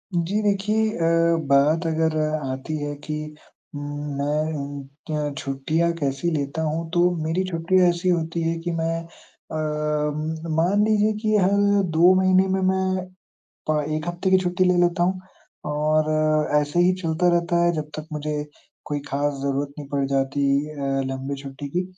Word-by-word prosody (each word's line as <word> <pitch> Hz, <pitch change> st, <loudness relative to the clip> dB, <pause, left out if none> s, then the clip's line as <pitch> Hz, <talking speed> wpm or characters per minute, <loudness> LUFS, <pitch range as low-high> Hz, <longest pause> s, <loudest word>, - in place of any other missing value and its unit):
जी, 185 Hz, +6 st, 0 dB
देखिए 210 Hz, +2 st, +1 dB
अ, 165 Hz, 0 st, +3 dB
बात 150 Hz, +5 st, +3 dB
अगर 160 Hz, 0 st, +1 dB, 0.2 s
आती 135 Hz, +1 st, -4 dB
है 145 Hz, 0 st, -3 dB
कि 155 Hz, -, -3 dB, 0.6 s
मैं 145 Hz, +1 st, -2 dB
उम, 140 Hz, -1 st, -6 dB, 0.4 s
अ, -, -, -7 dB
छुट्टियाँ 155 Hz, +5 st, 0 dB
कैसी 140 Hz, +3 st, -1 dB
लेता 145 Hz, +1 st, -2 dB
हूँ, 160 Hz, +1 st, -2 dB
तो 175 Hz, 0 st, +4 dB
मेरी 165 Hz, +4 st, 0 dB
छुट्टियाँ 180 Hz, +2 st, +3 dB
ऐसी 175 Hz, +1 st, 0 dB
होती 165 Hz, -1 st, 0 dB
हैं 165 Hz, 0 st, -1 dB
कि 175 Hz, 0 st, -3 dB
मैं 165 Hz, +1 st, 0 dB
अ, 165 Hz, -1 st, -14 dB
उम, 155 Hz, +1 st, -2 dB
मान 190 Hz, +6 st, +3 dB
लीजिए 215 Hz, 0 st, +3 dB
कि 215 Hz, -1 st, +1 dB
हर 190 Hz, 0 st, +3 dB, 0.5 s
2 180 Hz, +3 st, +7 dB
महीने 185 Hz, 0 st, +4 dB
में 190 Hz, 0 st, 0 dB
मैं 185 Hz, 0 st, +1 dB, 0.6 s
प 150 Hz, -1 st, +2 dB
1 155 Hz, +2 st, -4 dB
हफ़्ते 175 Hz, +2 st, -1 dB
की 190 Hz, -, +7 dB
छुट्टी 180 Hz, 0 st, +1 dB
ले 180 Hz, 0 st, +3 dB
लेता 175 Hz, 0 st, +2 dB
हूँ। 185 Hz, +1 st, 0 dB, 0.5 s
और 155 Hz, +1 st, +1 dB, 0.4 s
ऐसे 150 Hz, +3 st, +1 dB
ही 180 Hz, +1 st, +4 dB
चलता 165 Hz, +2 st, +1 dB
रहता 170 Hz, 0 st, +1 dB
है, 175 Hz, -, +4 dB
जब 150 Hz, -1 st, -4 dB
तक 155 Hz, 0 st, -7 dB
मुझे 150 Hz, 0 st, -2 dB, 0.4 s
कोई 145 Hz, -1 st, -2 dB
ख़ास 145 Hz, +1 st, 0 dB
ज़रूरत 140 Hz, +1 st, -2 dB
नहीं 145 Hz, -, -8 dB
पड़ 140 Hz, -1 st, +1 dB
जाती 140 Hz, +1 st, 0 dB, 0.3 s
अ, 155 Hz, -, -10 dB, 0.4 s
लंबी 135 Hz, +1 st, -4 dB
छुट्टी 140 Hz, +1 st, -7 dB
की, 180 Hz, +5 st, -1 dB
160 Hz, 165 wpm, -23 LUFS, 145-175 Hz, 0.6 s, 2